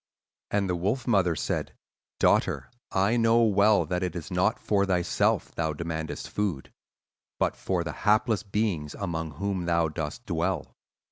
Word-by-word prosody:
"And 100 Hz, -1 st, +1 dB
the 90 Hz, -, 0 dB
wolf 105 Hz, +8 st, -1 dB
mother 95 Hz, -7 st, +3 dB
said, 75 Hz, -, -2 dB, 0.4 s
'Daughter, -, -, +2 dB, 0.2 s
I 100 Hz, +5 st, +2 dB
know 115 Hz, 0 st, +4 dB
well 105 Hz, -1 st, +4 dB
that 90 Hz, -1 st, -2 dB
it 90 Hz, 0 st, -2 dB
is 85 Hz, -3 st, -6 dB
not -, -, +2 dB
for 100 Hz, -2 st, +1 dB
thyself 90 Hz, -2 st, +1 dB
thou 80 Hz, -2 st, -1 dB
demandest 80 Hz, 0 st, -4 dB
food, 100 Hz, -10 st, -2 dB, 0.7 s
but -, -, +1 dB
for 90 Hz, -3 st, -1 dB
the 85 Hz, -, -4 dB
helpless 110 Hz, +1 st, +2 dB
beings 100 Hz, -7 st, -2 dB
among 80 Hz, -5 st, -3 dB
whom 95 Hz, +2 st, -2 dB
thou 85 Hz, -1 st, +2 dB
dost 80 Hz, +10 st, -5 dB
dwell. 85 Hz, -2 st, -2 dB
95 Hz, 150 wpm, -27 LUFS, 85-105 Hz, 0.7 s, know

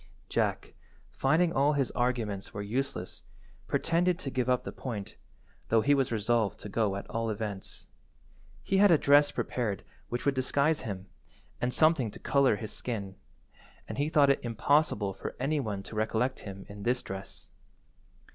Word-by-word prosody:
Jack, -, -, -1 dB, 0.4 s
finding 160 Hz, +6 st, +3 dB
that -, -, -6 dB
all 140 Hz, +3 st, +4 dB
his 140 Hz, -3 st, 0 dB
arguments 115 Hz, -5 st, -2 dB
were 100 Hz, -, -3 dB
useless, 115 Hz, -4 st, -3 dB, 0.5 s
pretended 170 Hz, +1 st, +2 dB
to 140 Hz, -6 st, -5 dB
give 125 Hz, -1 st, 0 dB
up 125 Hz, -1 st, +2 dB
the -, -, -5 dB
point, 110 Hz, -7 st, -6 dB, 0.5 s
though 115 Hz, 0 st, +4 dB
he 145 Hz, +5 st, +4 dB
was 135 Hz, -3 st, +2 dB
resolved 110 Hz, -1 st, +1 dB
to -, -, -7 dB
go 105 Hz, -2 st, +1 dB
at 100 Hz, -, -6 dB
all 115 Hz, 0 st, -2 dB
events. 105 Hz, -2 st, -5 dB, 0.8 s
He 195 Hz, -, +1 dB
had 205 Hz, +1 st, +7 dB
a 165 Hz, -, +7 dB
dress 145 Hz, +1 st, +5 dB
prepared 110 Hz, -6 st, -2 dB, 0.3 s
which 120 Hz, -, -3 dB
would 140 Hz, -, +3 dB
disguise 140 Hz, +4 st, +1 dB
him, 95 Hz, -3 st, -5 dB, 0.6 s
and 125 Hz, -, +1 dB
something 155 Hz, -5 st, +3 dB
to -, -, -11 dB
colour 135 Hz, -4 st, +3 dB
his 110 Hz, +1 st, -6 dB
skin, 100 Hz, -6 st, -4 dB, 0.7 s
and -, -, -5 dB
he 145 Hz, +2 st, +1 dB
thought 145 Hz, -3 st, +5 dB
it 140 Hz, -, +1 dB
impossible 115 Hz, -3 st, +2 dB
for -, -, -6 dB
any 145 Hz, +4 st, +1 dB
one 105 Hz, -7 st, -3 dB
to 110 Hz, -, -9 dB
recollect 110 Hz, +4 st, 0 dB
him 100 Hz, -1 st, -8 dB
in 100 Hz, 0 st, -10 dB
this 125 Hz, +4 st, 0 dB
dress. 95 Hz, 0 st, -7 dB
120 Hz, 170 wpm, -30 LUFS, 105-140 Hz, 0.8 s, had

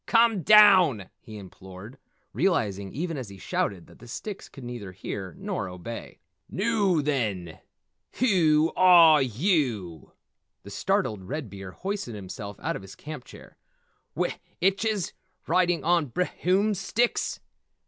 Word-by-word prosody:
Come 230 Hz, -4 st, +4 dB
down!" 185 Hz, -, +6 dB
he 110 Hz, -1 st, -11 dB
implored, 95 Hz, +4 st, -12 dB, 0.3 s
realizing 100 Hz, -, 0 dB
even 165 Hz, +1 st, -4 dB
as 125 Hz, -6 st, -6 dB
he 100 Hz, -, -11 dB
shouted 95 Hz, -1 st, -2 dB
that -, -, -19 dB
the 120 Hz, -, -13 dB
sticks 200 Hz, -, -7 dB
could 135 Hz, -, -12 dB
neither 120 Hz, -6 st, -7 dB
hear 95 Hz, -1 st, -6 dB
nor 95 Hz, -, -4 dB
obey. 90 Hz, +6 st, -8 dB, 0.3 s
"Noo 195 Hz, -6 st, +1 dB
then, 105 Hz, -, -2 dB, 0.5 s
whew 165 Hz, -9 st, +3 dB
are 170 Hz, -5 st, +7 dB
yew?" 120 Hz, -, -1 dB, 0.5 s
The -, -, -11 dB
startled 100 Hz, -4 st, -1 dB
Red 135 Hz, -2 st, -5 dB
Beard 95 Hz, -2 st, -9 dB
hoisted 190 Hz, -, -4 dB
himself 100 Hz, +1 st, -8 dB
out -, -, -2 dB
of -, -, -6 dB
his 95 Hz, 0 st, -12 dB
camp 150 Hz, -4 st, -9 dB
chair. -, -, -15 dB, 0.6 s
"W -, -, 0 dB, 0.3 s
itches 195 Hz, +1 st, 0 dB, 0.3 s
riding 175 Hz, -2 st, +1 dB
on 170 Hz, -2 st, +2 dB
br 155 Hz, +9 st, 0 dB
hoom 195 Hz, +4 st, 0 dB
sticks? 210 Hz, +5 st, -1 dB
145 Hz, 135 wpm, -26 LUFS, -, 0.6 s, are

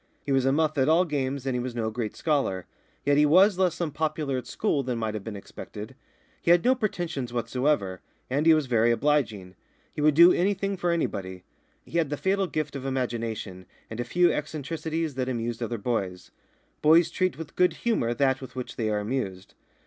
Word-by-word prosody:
He 140 Hz, -, -2 dB
was 135 Hz, -1 st, +3 dB
a 135 Hz, -, +4 dB
muff 155 Hz, 0 st, +1 dB
at 130 Hz, +3 st, +3 dB
all 170 Hz, +3 st, +4 dB
games, 140 Hz, -4 st, -2 dB
and 130 Hz, -2 st, -1 dB
he -, -, 0 dB
was 125 Hz, 0 st, -4 dB
no 110 Hz, -2 st, -1 dB
great 110 Hz, -1 st, -4 dB
scholar; 135 Hz, -, 0 dB, 0.4 s
yet 145 Hz, 0 st, +3 dB
he 150 Hz, -, +5 dB
was 185 Hz, +5 st, +5 dB
less 185 Hz, -3 st, +1 dB
unpopular 155 Hz, -3 st, -1 dB
at 125 Hz, -, -4 dB
school 180 Hz, -10 st, 0 dB
than 125 Hz, -2 st, -3 dB
might 110 Hz, -2 st, -2 dB
have 105 Hz, -2 st, -5 dB
been 110 Hz, -1 st, -6 dB
expected. 105 Hz, +3 st, -9 dB, 0.5 s
He -, -, -1 dB
had 175 Hz, 0 st, +5 dB
no 255 Hz, -, +6 dB
pretensions 175 Hz, -, -3 dB
whatever, 120 Hz, -4 st, -1 dB, 0.3 s
and 145 Hz, +5 st, 0 dB
he 160 Hz, -, +8 dB
was 155 Hz, -2 st, 0 dB
very 120 Hz, -2 st, +3 dB
obliging. 115 Hz, -8 st, 0 dB, 0.4 s
He -, -, -4 dB
would 150 Hz, -1 st, +4 dB
do 170 Hz, +3 st, +8 dB
anything 195 Hz, +2 st, 0 dB
for 175 Hz, -1 st, -1 dB
anybody. 95 Hz, -, -2 dB, 0.4 s
He 170 Hz, -, -1 dB
had 160 Hz, -4 st, 0 dB
the 145 Hz, -, -2 dB
fatal 195 Hz, +2 st, +1 dB
gift 155 Hz, -3 st, -3 dB
of 135 Hz, -, -5 dB
imagination, 115 Hz, -8 st, -3 dB, 0.2 s
and 110 Hz, -, -6 dB
a -, -, 0 dB
few 175 Hz, +8 st, +3 dB
eccentricities 155 Hz, +1 st, -3 dB
that 130 Hz, 0 st, -2 dB
amused 120 Hz, -1 st, -3 dB
other 120 Hz, 0 st, -2 dB
boys. 100 Hz, -5 st, -3 dB, 0.5 s
Boys 165 Hz, +2 st, +5 dB
treat 185 Hz, 0 st, 0 dB
with 160 Hz, -, -8 dB
good 180 Hz, 0 st, +3 dB
humour 120 Hz, -, +1 dB
that 135 Hz, -1 st, +1 dB
with 130 Hz, -2 st, -10 dB
which 125 Hz, -1 st, -6 dB
they 110 Hz, -2 st, 0 dB
are 105 Hz, -, 0 dB
amused. 105 Hz, -5 st, -4 dB
135 Hz, 200 wpm, -26 LUFS, 115-160 Hz, 0.5 s, he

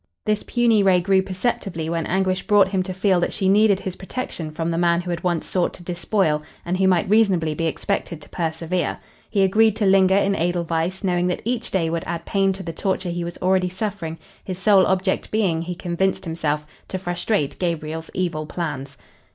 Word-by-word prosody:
This 210 Hz, -1 st, +1 dB
puny 235 Hz, -3 st, +2 dB
ray 190 Hz, -2 st, +4 dB
grew 190 Hz, +2 st, +3 dB
perceptibly 185 Hz, -3 st, -2 dB
when 165 Hz, 0 st, -2 dB
Anguish 185 Hz, 0 st, 0 dB
brought 205 Hz, -3 st, +5 dB
him 190 Hz, -1 st, 0 dB
to 185 Hz, +1 st, -4 dB
feel 185 Hz, 0 st, +2 dB
that 175 Hz, -, 0 dB
she 190 Hz, -, 0 dB
needed 200 Hz, 0 st, +4 dB
his 185 Hz, -2 st, -4 dB
protection 190 Hz, -5 st, -5 dB
from 165 Hz, +2 st, -3 dB
the 165 Hz, -, -1 dB
man 170 Hz, 0 st, +3 dB
who 175 Hz, 0 st, -5 dB
had 170 Hz, -, -3 dB
once 175 Hz, -3 st, 0 dB
sought 180 Hz, -2 st, 0 dB
to 175 Hz, -, -13 dB
despoil 175 Hz, -3 st, 0 dB, 0.2 s
and 175 Hz, +1 st, -1 dB
who 190 Hz, -, +4 dB
might 185 Hz, +1 st, +3 dB
reasonably 190 Hz, -7 st, +3 dB
be 165 Hz, +2 st, -1 dB
expected 170 Hz, 0 st, -2 dB
to -, -, -16 dB
persevere. 165 Hz, +1 st, -2 dB, 0.3 s
He 200 Hz, -2 st, +2 dB
agreed 215 Hz, +3 st, +4 dB
to 220 Hz, -2 st, 0 dB
linger 190 Hz, 0 st, +5 dB
in 200 Hz, 0 st, +3 dB
Edelweiss, 170 Hz, +2 st, -1 dB
knowing 180 Hz, -2 st, +1 dB
that 180 Hz, -, -2 dB
each 240 Hz, 0 st, -2 dB
day 175 Hz, -4 st, 0 dB
would 170 Hz, -1 st, -2 dB
add 170 Hz, 0 st, -4 dB
pain 195 Hz, -1 st, +2 dB
to 190 Hz, 0 st, -7 dB
the 165 Hz, -2 st, -5 dB
torture 190 Hz, +1 st, -1 dB
he 175 Hz, 0 st, -3 dB
was 170 Hz, 0 st, -6 dB
already 185 Hz, 0 st, +2 dB
suffering, 185 Hz, -4 st, -4 dB, 0.3 s
his 185 Hz, -2 st, -5 dB
sole 190 Hz, 0 st, +5 dB
object 190 Hz, 0 st, 0 dB
being, 190 Hz, -7 st, +1 dB
he 175 Hz, +1 st, -4 dB
convinced 180 Hz, +2 st, -1 dB
himself, 150 Hz, -2 st, -2 dB, 0.2 s
to 190 Hz, -, -3 dB
frustrate 175 Hz, -3 st, -1 dB
Gabriel's 160 Hz, -2 st, -3 dB
evil 170 Hz, -4 st, -2 dB
plans. 140 Hz, -5 st, -5 dB
180 Hz, 200 wpm, -22 LUFS, 170-195 Hz, 0.3 s, brought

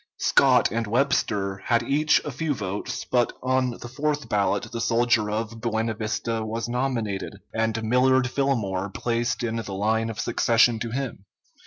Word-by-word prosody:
Scott -, -, +4 dB
and 115 Hz, 0 st, -1 dB
Webster 105 Hz, -5 st, +1 dB
had 120 Hz, -1 st, +2 dB
each 150 Hz, +5 st, +3 dB
a 145 Hz, -, -3 dB
few 145 Hz, +2 st, -2 dB
votes; 100 Hz, -2 st, -4 dB
but 120 Hz, -1 st, +1 dB
on 130 Hz, 0 st, +2 dB
the 120 Hz, 0 st, -7 dB
fourth 150 Hz, +3 st, -2 dB
ballot 100 Hz, +2 st, 0 dB
the 115 Hz, -1 st, -4 dB
soldier 115 Hz, -2 st, +2 dB
of 110 Hz, +1 st, -3 dB
Buena 115 Hz, -1 st, -1 dB
Vista 110 Hz, +1 st, -2 dB
was 115 Hz, +2 st, -3 dB
nominated, 120 Hz, -6 st, -2 dB, 0.2 s
and 115 Hz, 0 st, -1 dB
Millard 125 Hz, +3 st, +3 dB
Fillmore 110 Hz, -8 st, -1 dB
placed 120 Hz, +4 st, -1 dB
in 115 Hz, -1 st, -1 dB
the 105 Hz, -3 st, -5 dB
line 110 Hz, +3 st, 0 dB
of 110 Hz, -, -6 dB
succession 115 Hz, 0 st, +3 dB
to 115 Hz, -, -3 dB
him. 125 Hz, -5 st, -4 dB
115 Hz, 160 wpm, -25 LUFS, 110-125 Hz, 0.2 s, Scott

